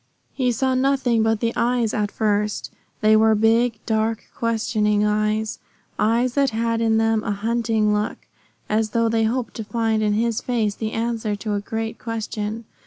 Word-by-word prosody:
He 255 -3 +1
saw 260 +3 0
nothing 255 -3 +2
but 225 -1 +1
the 230 0 0
eyes 240 -2 +1
at 210 -1 0
first. 210 -1 -1 0.3
They 215 0 +5
were 220 0 +5
big, 225 +2 +3
dark, 220 0 0
questing 215 -2 +1
eyes 215 +1 0 0.4
eyes 235 +3 +2
that 275 0 +2
had 230 0 -1
in 225 -1 +3
them 225 -1 +2
a - - -3
hunting 220 0 0
look, 210 0 -1 0.5
as 215 0 +1
though 230 0 +3
they 225 0 +2
hoped 240 +2 -2
to 225 - -4
find 225 0 0
in 210 -1 +1
his 225 +1 0
face 225 -4 0
the 220 +1 -4
answer 225 -2 -1
to 210 +1 -4
a 205 - -1
great 225 +1 -4
question. 220 -1 -4
225 Hz, 175 wpm, -22 LUFS, 215-230 Hz, 0.5 s, They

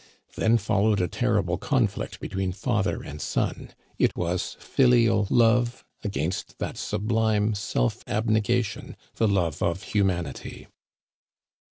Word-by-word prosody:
Then 115 +1 +3
followed 105 -1 +2
a 90 - +1
terri - - +1
ble - - -2
conflict - - -1
between 95 -1 -3
father 105 0 -1
and 75 +1 -8
son. - - -2 0.3
It - - +2
was 90 +1 -2
filial 115 -5 +3
love 120 +1 +3 0.2
against 90 -4 -3
that - - -4
sublime 110 0 0
self 80 -12 -1
abnegation, 110 +1 0 0.2
the 110 - +3
love 85 -6 0
of 85 +3 0
hu 105 -2 +4
manity. 85 -7 -3
105 Hz, 125 wpm, -26 LUFS, 90-115 Hz, 0.3 s, hu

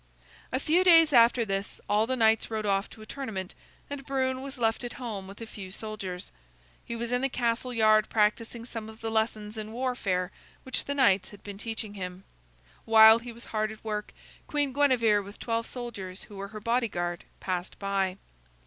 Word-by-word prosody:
A 260 - 0
few 330 +6 +3
days 330 -4 +7
after 235 0 +6
this 195 -1 -3
all 210 +2 +2
the 260 - +1
knights 225 -2 +3
rode 220 -1 -2
off 195 0 +1
to 220 - -12
a - - -11
tournament 215 -8 -5 0.3
and 285 -1 -5
Brune 260 -1 -1
was 275 0 -7
left 225 0 +1
at 240 - -5
home 215 -6 -5
with 195 +1 -11
a - - -4
few 200 -3 -8
soldiers. 195 -3 -5 0.5
He 235 - -5
was 235 +1 -3
in 245 0 +1
the 270 - +1
castle 245 0 -1
yard 215 -2 +4
practicing 225 +2 +1
some 225 -3 -6
of 220 0 -13
the 225 0 -3
lessons 220 -1 -1
in 215 0 -5
warfare 220 -7 -1 0.3
which 260 - -1
the 285 - -2
knights 200 -9 +4
had 205 - -14
been 200 -1 -8
teaching 220 -2 -4
him. 185 -1 -6 0.6
While 220 0 +8
he 240 +1 -8
was 235 +1 -8
hard 215 0 0
at 215 - -12
work, 210 -1 -3 0.4
Queen 290 -3 0
Guinevere 245 -7 +4
with 200 +1 -11
twelve 230 -1 -2
soldiers 205 -7 -6
who 205 - -13
were 200 0 -5
her 215 +1 -8
bodyguard 210 -7 -1 0.2
passed 180 -1 -3
by. 195 -2 -1
220 Hz, 195 wpm, -28 LUFS, 200-245 Hz, 0.6 s, While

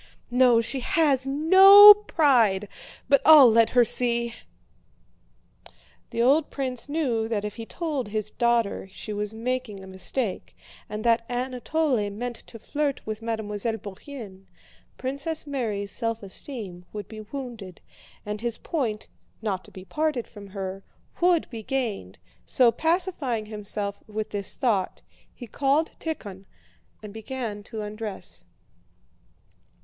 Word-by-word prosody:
No, 245 -2 +5
she 260 +4 -2
has 270 -1 +1
no 380 +8 +9
pride... 250 - +2 0.4
but 280 -1 +4
I'll 295 -6 +9
let 225 0 +4
her 245 -1 +4
see...." 235 0 0 1.8
The 230 - -1
old 285 +5 +3
prince 260 -1 -4
knew 255 -8 0
that 210 -3 -2
if 210 - -6
he 225 -1 -7
told 300 -9 -3
his 215 0 -3
daughter 235 -5 0
she 210 +2 -7
was 210 +1 -3
making 235 -4 -4
a - - -10
mistake 190 +3 -4 0.3
and 210 0 -5
that 230 -1 +3
Anatole 250 -1 -1
meant 235 +3 -5
to 230 - -11
flirt 285 +5 -3
with 215 0 -5
Mademoiselle 220 -1 -3
Bourienne, 200 -1 -10 0.5
Princess 280 +5 -3
Mary's 220 -8 -3
self 230 -2 -2
esteem 195 -3 -6
would 210 -2 -7
be 220 -1 -9
wounded 225 -5 -8 0.5
and 210 0 -5
his 235 -1 -2
point 240 -10 -3 0.3
(not 195 -4 -3
to - - -15
be 185 0 -11
parted 300 -2 -2
from 205 -2 -12
her) 195 0 -6 0.4
would 350 -2 +3
be 230 -2 -6
gained, 215 - -3 0.3
so 245 -3 +4
pacifying 320 - -1
himself 205 -1 -2
with 215 0 -5
this 200 -2 -3
thought, 215 -8 -1 0.3
he 245 - -10
called 280 +6 0
Tíkhon 200 - -6 0.6
and 210 -1 -9
began 220 -2 -5
to 220 -2 -6
undress. 210 -1 -6
230 Hz, 135 wpm, -25 LUFS, 210-270 Hz, 1.8 s, no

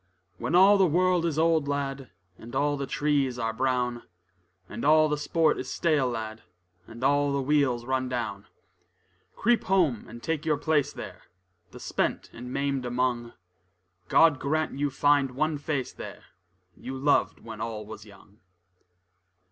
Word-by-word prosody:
When 170 - -1
all 195 +3 +7
the 190 - +5
world 175 +1 +2
is 155 -3 -2
old, 160 -2 +2
lad, 140 -2 -3 0.3
And 120 +3 -10
all 145 +2 +1
the 140 -1 -4
trees 140 -2 0
are 115 -2 -2
brown; 125 0 -1 0.7
And 115 - -7
all 155 +1 +5
the 150 - 0
sport 155 +1 +1
is - - -5
stale, 150 -6 +1
lad, 110 -2 -5 0.5
And 115 +2 -10
all 145 +1 +3
the 140 0 0
wheels 135 -4 +1
run 130 0 -1
down: 115 -5 -4 0.9
Creep 240 +2 +2
home 170 - +1
and 120 +1 -11
take 160 -2 -2
your 155 -2 +1
place 150 -1 +1
there, - - -9 0.4
The - - -12
spent - - -2
and 125 +2 -8
maimed 140 -1 -1
among: 120 -1 -1 0.7
God 160 -5 +5
grant 155 +3 0
you 145 0 +1
find 140 -1 +2
one 155 +1 0
face 145 -3 -3
there, - - -9 0.5
You 130 +1 -7
loved 140 +2 +1
when 110 -2 -9
all 110 -2 -4
was 110 0 -10
young. 100 0 -18
140 Hz, 155 wpm, -27 LUFS, 120-155 Hz, 0.9 s, all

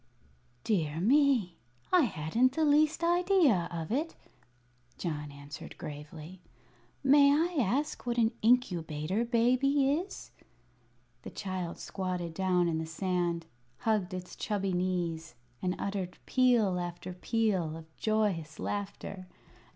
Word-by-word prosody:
"Dear 160 -7 0
me, 240 - +3 0.4
I 355 -5 +6
hadn't 225 +7 +1
the 315 +2 +1
least 305 +2 +3
idea 345 - +3
of 165 0 -5
it," 305 +7 -1 0.8
John 150 -4 -4
answered 140 +1 -10
gravely. 155 +4 -9 0.6
"May 280 +1 +6
I 330 +4 +1
ask 255 +5 -1
what 240 0 0
an 225 -1 +3
Incubator 185 -5 +1
Baby 255 +4 +3
is?" 345 +7 -4 0.9
The - - -8
child 185 -3 -4
squatted 180 -3 -4
down 180 -1 +2
in 160 -1 0
the 160 - -4
sand, 175 0 -1 0.4
hugged 215 -5 +1
its 180 0 -7
chubby 195 -3 -2
knees, 175 -5 -2 0.3
and 180 0 0
uttered 195 -3 -3
peal 235 -8 +3
after 175 +1 -5
peal 185 -5 0
of 160 0 -14
joyous 200 -8 0
laughter. 200 -2 -5
190 Hz, 120 wpm, -30 LUFS, 170-250 Hz, 0.9 s, I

